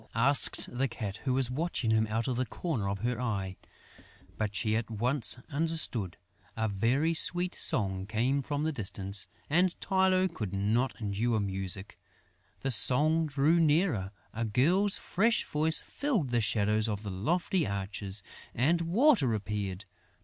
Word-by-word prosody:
asked 135 Hz, +4 st, +4 dB
the 135 Hz, +2 st, +1 dB
Cat, 105 Hz, -4 st, -5 dB
who 130 Hz, -, +1 dB
was 130 Hz, -2 st, +2 dB
watching 135 Hz, -5 st, -1 dB
him 110 Hz, 0 st, +2 dB
out 110 Hz, +2 st, -2 dB
of 130 Hz, -, -1 dB
the 125 Hz, -, 0 dB
corner 120 Hz, -, -3 dB
of 100 Hz, -1 st, -4 dB
her 120 Hz, 0 st, -2 dB
eye. 100 Hz, -6 st, -2 dB, 0.8 s
But 105 Hz, -2 st, -3 dB
she 110 Hz, 0 st, +1 dB
at 115 Hz, 0 st, -2 dB
once 120 Hz, +4 st, 0 dB
understood. 145 Hz, -, 0 dB, 0.4 s
A 110 Hz, 0 st, 0 dB
very 120 Hz, +11 st, +1 dB
sweet 175 Hz, +2 st, +3 dB
song 95 Hz, -2 st, -1 dB
came 120 Hz, +6 st, 0 dB
from 145 Hz, +2 st, -3 dB
the 160 Hz, -, 0 dB
distance; 100 Hz, -5 st, -2 dB, 0.2 s
and 175 Hz, +4 st, +2 dB
Tylô 190 Hz, -1 st, +2 dB
could 100 Hz, -4 st, -5 dB
not 110 Hz, +6 st, 0 dB
endure 110 Hz, +2 st, -1 dB
music. 95 Hz, -1 st, -4 dB, 0.6 s
The 135 Hz, -, -1 dB
song 155 Hz, +7 st, +3 dB
drew 145 Hz, +4 st, +2 dB
nearer, 150 Hz, -, +2 dB, 0.2 s
a 115 Hz, -, -3 dB
girl's 170 Hz, -, +2 dB
fresh 225 Hz, +5 st, +1 dB
voice 155 Hz, +2 st, +3 dB
filled 225 Hz, -, -2 dB
the 120 Hz, -1 st, +2 dB
shadows 105 Hz, 0 st, +1 dB
of 105 Hz, 0 st, -4 dB
the 100 Hz, -, -5 dB
lofty 170 Hz, -, 0 dB
arches 100 Hz, 0 st, -4 dB, 0.3 s
and 160 Hz, +8 st, +2 dB
Water 175 Hz, -, +3 dB
appeared. 100 Hz, -2 st, -4 dB
120 Hz, 150 wpm, -30 LUFS, 105-160 Hz, 0.8 s, asked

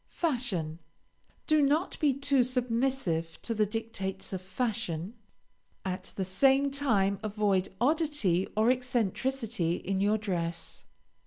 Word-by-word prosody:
FASHION 225 Hz, -, -1 dB, 0.7 s
Do 310 Hz, -1 st, +4 dB
not 295 Hz, +6 st, +1 dB
be 295 Hz, -2 st, +4 dB
too 275 Hz, -1 st, +2 dB
submissive 245 Hz, -9 st, -1 dB
to 230 Hz, -, 0 dB
the 215 Hz, -1 st, +2 dB
dictates 200 Hz, -3 st, -4 dB
of 185 Hz, -, -3 dB
fashion; 185 Hz, -3 st, -2 dB, 0.7 s
at 185 Hz, 0 st, -4 dB
the 190 Hz, -, -1 dB
same 270 Hz, +9 st, +3 dB
time 205 Hz, -9 st, +2 dB
avoid 205 Hz, -3 st, +1 dB
oddity 270 Hz, -, +2 dB
or 220 Hz, +3 st, +5 dB
eccentricity 240 Hz, -6 st, 0 dB
in 190 Hz, +1 st, -2 dB
your 210 Hz, +2 st, +3 dB
dress. 170 Hz, -5 st, -3 dB
220 Hz, 115 wpm, -30 LUFS, 190-265 Hz, 0.7 s, or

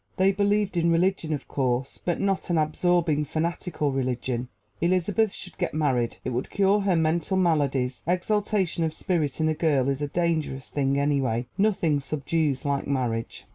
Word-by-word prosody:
They 190 Hz, +1 st, +4 dB
believed 205 Hz, -1 st, +1 dB
in 170 Hz, 0 st, +3 dB
religion, 170 Hz, -1 st, +1 dB
of 145 Hz, -3 st, -3 dB
course 130 Hz, -1 st, -1 dB
but 175 Hz, -, -1 dB
not 195 Hz, -2 st, -1 dB
an 170 Hz, -, +2 dB
absorbing, 155 Hz, 0 st, +2 dB
fanatical 160 Hz, -1 st, -2 dB
religion! 125 Hz, -2 st, -2 dB, 0.3 s
Elizabeth 185 Hz, +5 st, +2 dB
should 185 Hz, -1 st, -9 dB
get 175 Hz, -4 st, -1 dB
married 130 Hz, -6 st, 0 dB
it 130 Hz, -, -1 dB
would 125 Hz, +2 st, -2 dB
cure 200 Hz, +1 st, +3 dB
her 195 Hz, -3 st, +1 dB
mental 165 Hz, +3 st, +1 dB
maladies: 140 Hz, -7 st, +1 dB
exaltation 190 Hz, -1 st, 0 dB
of 160 Hz, -1 st, -1 dB
spirit 155 Hz, -7 st, -1 dB
in 160 Hz, -, +2 dB
a 155 Hz, -, +2 dB
girl 150 Hz, -5 st, +1 dB
is 140 Hz, +1 st, -1 dB
a 145 Hz, -, 0 dB
dangerous 155 Hz, -4 st, -1 dB
thing 140 Hz, -1 st, +1 dB
anyway. 135 Hz, -5 st, +1 dB
Nothing 185 Hz, -7 st, +2 dB
subdues 145 Hz, 0 st, -1 dB
like 140 Hz, -1 st, -1 dB
marriage. 120 Hz, -5 st, -2 dB
155 Hz, 165 wpm, -26 LUFS, 135-180 Hz, 0.3 s, They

